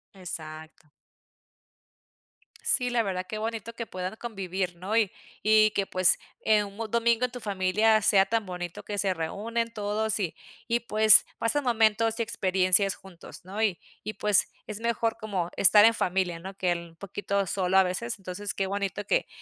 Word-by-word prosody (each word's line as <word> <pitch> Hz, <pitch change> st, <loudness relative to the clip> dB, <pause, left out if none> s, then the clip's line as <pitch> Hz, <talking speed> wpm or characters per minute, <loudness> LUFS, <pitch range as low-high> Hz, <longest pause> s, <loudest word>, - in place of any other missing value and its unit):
Exacto. 160 Hz, -4 st, -9 dB, 1.8 s
Sí, 250 Hz, -1 st, +2 dB
la 240 Hz, -1 st, +1 dB
verdad 185 Hz, -2 st, -3 dB
qué 215 Hz, +3 st, -5 dB
bonito 225 Hz, 0 st, -5 dB
que 230 Hz, 0 st, -6 dB
puedan 185 Hz, +2 st, -5 dB
convivir, 190 Hz, -5 st, -4 dB
¿no?, 190 Hz, +6 st, -4 dB
y 215 Hz, -4 st, +2 dB, 0.4 s
y 215 Hz, 0 st, +6 dB
que 200 Hz, -, -1 dB
pues, 185 Hz, -2 st, +3 dB, 0.3 s
eh, 215 Hz, -1 st, +3 dB
un 200 Hz, 0 st, -10 dB
domingo 235 Hz, +2 st, +2 dB
en 250 Hz, -, -5 dB
tu 250 Hz, -, -7 dB
familia 210 Hz, +1 st, +2 dB
sea 195 Hz, -2 st, +4 dB
tan 225 Hz, -1 st, -1 dB
bonito 175 Hz, -1 st, -6 dB
que 205 Hz, -1 st, -5 dB
se 195 Hz, -2 st, +1 dB
reúnen 225 Hz, +8 st, -3 dB
todos 215 Hz, 0 st, -2 dB
y 170 Hz, -5 st, -2 dB, 0.3 s
y 235 Hz, 0 st, +1 dB
pues 215 Hz, -2 st, +6 dB
pasen 285 Hz, +6 st, +3 dB
momentos 225 Hz, -1 st, +2 dB
y -, -, +2 dB
experiencias 190 Hz, -1 st, +2 dB
juntos, 180 Hz, -2 st, -14 dB
¿no? 200 Hz, +4 st, -5 dB
Y 200 Hz, -6 st, +1 dB, 0.3 s
y 215 Hz, -, -5 dB
pues 210 Hz, -2 st, +1 dB, 0.2 s
es 215 Hz, -1 st, -6 dB
mejor 230 Hz, -1 st, -1 dB
como 190 Hz, -5 st, -3 dB
estar 205 Hz, +2 st, +7 dB
en 230 Hz, -, +5 dB
familia, 180 Hz, -4 st, -1 dB
¿no?, 190 Hz, +3 st, -9 dB
que 180 Hz, -2 st, 0 dB
el 170 Hz, -1 st, -5 dB
poquito 200 Hz, +1 st, -3 dB
solo 185 Hz, 0 st, 0 dB
a 190 Hz, -, +7 dB
veces. 230 Hz, +6 st, -3 dB
Entonces 195 Hz, +1 st, -5 dB
qué 195 Hz, -, -1 dB
bonito 200 Hz, +1 st, -3 dB
que -, -, 0 dB
200 Hz, 175 wpm, -27 LUFS, 185-220 Hz, 1.8 s, estar